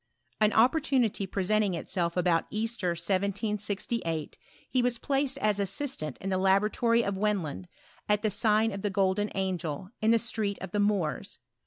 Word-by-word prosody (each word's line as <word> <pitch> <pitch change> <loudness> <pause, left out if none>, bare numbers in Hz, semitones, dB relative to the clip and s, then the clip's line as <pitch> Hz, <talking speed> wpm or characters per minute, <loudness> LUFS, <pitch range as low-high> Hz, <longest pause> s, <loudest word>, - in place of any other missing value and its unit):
An 215 0 +4
opportunity 245 -4 +2
presenting 200 0 +1
itself 170 +1 -2
■about 175 -2 +2
Easter, 215 -4 -1
1768, 200 -1 -2 0.3
he 255 - +1
was 245 -1 +1
placed 275 +2 0
as 210 -5 +1
assistant 200 - -3
in 195 - -3
the 185 - +1
laboratory 210 +5 +3
of 200 -2 -1
Wendland, 175 - -1 0.4
at 210 +1 +2
the 215 - +2
sign 215 +1 +2
of 195 0 -5
the 205 - 0
Golden 195 +1 +1
Angel, 185 -2 -3
in 220 - +3
the 230 - +6
Street 215 -3 -2
of 190 -1 -7
the 210 - -1
Moors. 205 -6 0
205 Hz, 155 wpm, -29 LUFS, 185-220 Hz, 0.4 s, the